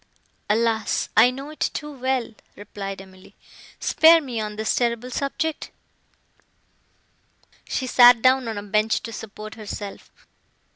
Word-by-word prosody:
"Alas! 220 0 0
I 225 +3 +7
know 275 +4 -7
it 310 - -14 0.2
too 300 0 -5
well," 260 -3 -2 0.2
replied 195 -1 -7
Emily: 190 0 -18 0.4
"spare 330 +1 +5
me 250 -7 -5
on 210 -1 -5
this 220 +1 -1
terrible 240 +1 -1
subject!" 290 +4 -3 2.0
She 260 - -2
sat 245 -1 +7
down 255 +1 +3
on 220 -2 -4
a 205 - -5
bench 215 +2 0
to 230 - -7
support 215 0 -9
herself. 210 -2 -8
230 Hz, 130 wpm, -23 LUFS, 215-260 Hz, 2.0 s, I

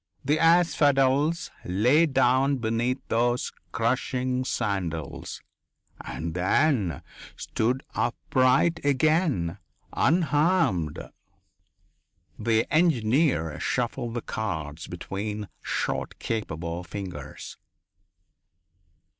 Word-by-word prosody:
The 150 +3 +2
asphodels 155 -2 +3
lay 125 - +3
down 135 0 +3
beneath 120 +2 0
those 120 +2 +1 0.2
crushing 130 0 0
sandals, 95 - -3 0.6
and 80 +1 -5
then 95 - +1 0.3
stood 125 +4 -1
upright 130 +6 +2
again, 140 - +1 0.3
unharmed." 150 - +2 1.4
The 110 +1 +2
engineer 130 - +2
shuffled 120 -1 -2
the 120 - -3
cards 80 -8 -4
between 100 +3 -5
short, - - -2
capable 85 -6 -4
fingers. 85 -6 -8
120 Hz, 70 wpm, -26 LUFS, 95-145 Hz, 1.4 s, asphodels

